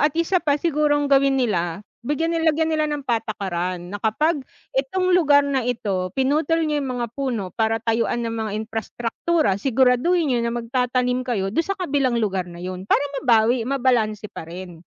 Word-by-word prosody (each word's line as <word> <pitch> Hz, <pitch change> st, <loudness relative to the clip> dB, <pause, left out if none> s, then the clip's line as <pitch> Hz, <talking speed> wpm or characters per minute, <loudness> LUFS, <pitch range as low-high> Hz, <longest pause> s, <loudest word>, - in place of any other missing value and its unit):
at 295 Hz, +1 st, +2 dB
isa 335 Hz, +2 st, +2 dB
pa 290 Hz, -3 st, +1 dB
sigurong 295 Hz, -2 st, +1 dB
gawin 275 Hz, 0 st, +4 dB
nila, 195 Hz, -7 st, -1 dB, 0.2 s
bigyan 310 Hz, +6 st, -1 dB
nila 330 Hz, -1 st, +2 dB
lagyan 320 Hz, 0 st, +1 dB
nila 310 Hz, -1 st, +1 dB
ng 295 Hz, -2 st, -3 dB
patakaran 185 Hz, -6 st, -3 dB
na 205 Hz, -, -5 dB
kapag 295 Hz, +9 st, +1 dB, 0.3 s
itong 365 Hz, +8 st, 0 dB
lugar 290 Hz, -5 st, +5 dB
na 280 Hz, -2 st, 0 dB
ito, 210 Hz, -7 st, -2 dB
pinutol 305 Hz, +5 st, +1 dB
niyo 300 Hz, -1 st, 0 dB
'yong 275 Hz, -, -3 dB
mga 240 Hz, -1 st, -1 dB
puno 235 Hz, -9 st, -3 dB
para 225 Hz, -1 st, +1 dB
tayuan 230 Hz, +1 st, 0 dB
ng 230 Hz, -, -2 dB
mga 220 Hz, -1 st, -3 dB
imprastraktura. 225 Hz, -, -1 dB
Siguraduhin 265 Hz, -, +3 dB
niyo 240 Hz, -, +1 dB
na 235 Hz, 0 st, -1 dB
magtatanim 250 Hz, +1 st, 0 dB
kayo 215 Hz, -7 st, -2 dB
do'n 330 Hz, -, 0 dB
sa 390 Hz, -, -1 dB
kabilang 275 Hz, -6 st, +1 dB
lugar 195 Hz, -5 st, -1 dB
na 175 Hz, 0 st, -9 dB
'yon, 185 Hz, +1 st, -6 dB
para 285 Hz, -, +3 dB, 0.2 s
mabawi, 235 Hz, -1 st, +3 dB
mabalanse 240 Hz, -6 st, +1 dB
pa 160 Hz, -, -8 dB
rin. 175 Hz, -1 st, -9 dB
250 Hz, 180 wpm, -22 LUFS, 215-290 Hz, 0.3 s, lugar